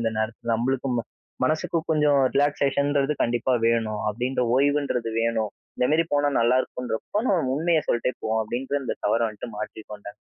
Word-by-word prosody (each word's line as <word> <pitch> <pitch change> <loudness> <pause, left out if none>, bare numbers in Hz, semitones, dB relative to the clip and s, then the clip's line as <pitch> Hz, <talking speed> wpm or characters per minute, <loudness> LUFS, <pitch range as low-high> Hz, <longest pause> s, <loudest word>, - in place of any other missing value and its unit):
இந்த 115 -1 0
நேரத்தில. 110 +1 -3
நம்மளுக்கும் 130 +2 -1
ம - - 0 0.4
மனசுக்கு 155 +2 0
கொஞ்சம் 150 -2 +4 0.2
ரிலாக்சேஷன்றது 140 0 +2
கண்டிப்பா 120 +2 +1
வேணும். 110 -2 +1
அப்பிடின்ற 125 +4 -1
ஓய்வுன்றது 140 -4 +1
வேணும். 115 -2 0 0.3
இந்தமாரி 155 +6 +3
போனா 145 0 +2
நல்லாயிருக்குன்றப்போ, 125 - 0
நம்ம 160 -9 +1
உண்மைய 165 0 +2
சொல்ட்டே 120 +1 +1
போவோம்," 110 0 0
அப்பிடின்ற 130 +6 -2
அந்த - - -3
தவற 110 +3 +2
வந்துட்டு 110 +3 -8
மாற்றி 110 - -6
கொண்டேங்க. 105 0 -9
125 Hz, 145 wpm, -25 LUFS, 115-145 Hz, 0.4 s, கொஞ்சம்